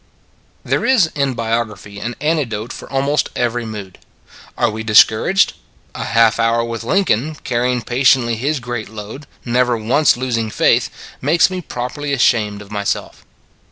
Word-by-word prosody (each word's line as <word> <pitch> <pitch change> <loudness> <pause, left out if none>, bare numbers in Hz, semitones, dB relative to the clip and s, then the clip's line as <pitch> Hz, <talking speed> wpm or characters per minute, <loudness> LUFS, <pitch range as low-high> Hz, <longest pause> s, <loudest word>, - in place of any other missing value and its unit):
" - - -37
There - - +2
is 220 -12 +3
in 140 -3 -1
biography 110 -3 -3
an 120 +3 -4
antidote 135 -8 -1
for - - -10
almost 140 +2 0
every 120 -1 -1
mood. 100 -4 -8 0.6
Are - - +2
we 110 +1 -5
discouraged? 110 - +4 0.4
A - - -5
half 115 0 +3
hour 115 0 +2
with 115 -1 -5
Lincoln, 155 - +1
carrying 125 0 0
patiently 120 -1 +2
his 140 +6 -1
great 120 -2 -5
load, 110 +6 -9 0.2
never 125 0 +1
once 120 +6 +2
losing 115 -3 -1
faith, - - +2 0.3
makes 165 +6 +3
me 185 -1 -3
properly 140 +1 -4
ashamed 105 -5 +1
of 100 - -17
myself. 100 -2 -3
120 Hz, 150 wpm, -18 LUFS, 110-140 Hz, 0.6 s, discouraged